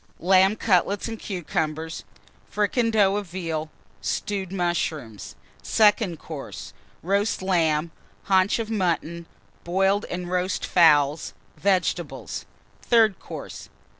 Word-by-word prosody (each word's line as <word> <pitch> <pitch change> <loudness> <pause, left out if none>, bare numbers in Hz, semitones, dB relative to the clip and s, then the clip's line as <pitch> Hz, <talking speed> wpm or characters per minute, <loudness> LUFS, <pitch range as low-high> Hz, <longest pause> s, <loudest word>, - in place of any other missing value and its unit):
Lamb 190 +3 +4
Cutlets 200 -1 +1
and 225 -1 -6
Cucumbers. 160 -4 -3 0.4
Fricandeau 210 -2 +2
of 205 -2 -4
Veal. 165 -3 -4 0.3
Stewed 195 -3 -3
Mushrooms. 165 - -3 0.3
SECOND 210 -5 +3
COURSE. 150 -2 -8 0.3
Roast 200 +3 0
Lamb. 165 -4 +1 0.3
Haunch 190 0 +3
of 225 -1 -4
Mutton. 170 -4 -1 0.4
Boiled 195 +3 +1
and 180 0 -5
Roast 185 +1 -1
Fowls. 150 -3 +3 0.2
Vegetables. 190 -2 -1 0.3
THIRD 220 -5 +3
COURSE. - - -9
185 Hz, 100 wpm, -24 LUFS, 165-200 Hz, 0.4 s, Lamb